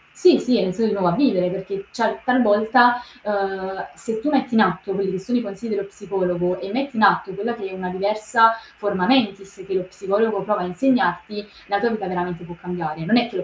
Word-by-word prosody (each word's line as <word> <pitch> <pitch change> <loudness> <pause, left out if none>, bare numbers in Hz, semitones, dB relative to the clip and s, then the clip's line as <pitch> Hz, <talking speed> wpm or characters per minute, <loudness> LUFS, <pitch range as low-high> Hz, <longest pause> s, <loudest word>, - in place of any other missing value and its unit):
sì, 360 -5 +6
sì 250 -2 +2
ha - - +2
iniziato 195 +4 0
di - - -1
nuovo 180 -3 +2
a 170 - 0
vivere 190 -11 +3
perché, 195 +1 -6
cioè 225 -2 -1
talvolta, 245 0 +4 0.2
ehm, 195 -2 -3
se 225 -1 -4
tu 300 - 0
metti 265 -4 0
in 225 - +5
atto 185 +1 +1
quelli 195 0 -1
che 190 - -3
sono 245 +6 -1
i - - 0
consigli 210 +2 -7
dello 200 - -2
psicologo 180 -3 -2
e 195 - -7
metti 270 +1 -3
in 220 - 0
atto 195 -1 +4
quella 215 +5 -3
che 200 -4 -6
è - - -10
una 185 -1 -5
diversa 215 +4 +3 0.2
forma 200 -3 -1
mentis 200 -6 +1
che 195 - -4
lo 190 -1 0
psicologo 200 +2 -1
prova 205 -1 0
a - - -2
insegnarti, 210 -1 0 0.2
la 200 0 0
tua 235 - +2
vita 215 -4 -3
veramente 180 -1 -4
può 175 0 -11
cambiare. 165 -3 -5
Non 235 +6 +4
è 235 -1 +3
che - - -12
lo 180 - -2
200 Hz, 230 wpm, -21 LUFS, 185-225 Hz, 0.2 s, sì